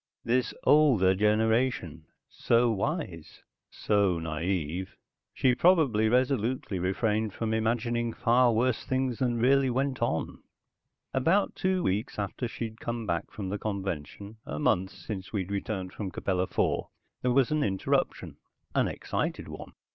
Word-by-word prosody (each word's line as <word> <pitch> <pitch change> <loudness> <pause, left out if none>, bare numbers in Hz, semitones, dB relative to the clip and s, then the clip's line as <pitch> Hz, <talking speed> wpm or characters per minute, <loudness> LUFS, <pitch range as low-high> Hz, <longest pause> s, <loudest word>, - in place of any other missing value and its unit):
This 125 +2 +1
older 130 -12 +5
generation 105 - +1 0.2
so 120 0 +2
wise, 100 - -4 0.3
so 100 -4 +1
naive. 80 +2 -3 0.4
She 130 - +2
probably 130 - +3
resolutely 125 -4 0
refrained 105 +3 0
from 110 -1 -2
imagining 115 +1 0
far 120 +2 +3
worse 120 +1 +1
things 130 -2 -1
than 120 -3 +1
really 135 +3 +3
went 130 +1 -1
on. 115 -9 -1 0.7
About 190 +10 +2
two 185 -1 0
weeks 105 +7 -1
after 105 +4 -3
she'd 115 -1 -6
come 120 -1 -4
back 85 -4 -2
from 100 -3 -6
the 100 +1 -3
convention, 100 0 -5
a 75 - -6
month 90 +5 +1
since 95 -2 -7
we 100 -4 -1
returned 100 -1 -4
from 100 -3 -4
Capella 90 0 -1
IV, - - 0 0.4
there 125 - +1
was 130 +1 +3
an 155 0 +1
interruption, 95 -6 -1 0.4
an - - +2
excited - - -3
one. - - -9
110 Hz, 135 wpm, -28 LUFS, 95-125 Hz, 0.7 s, older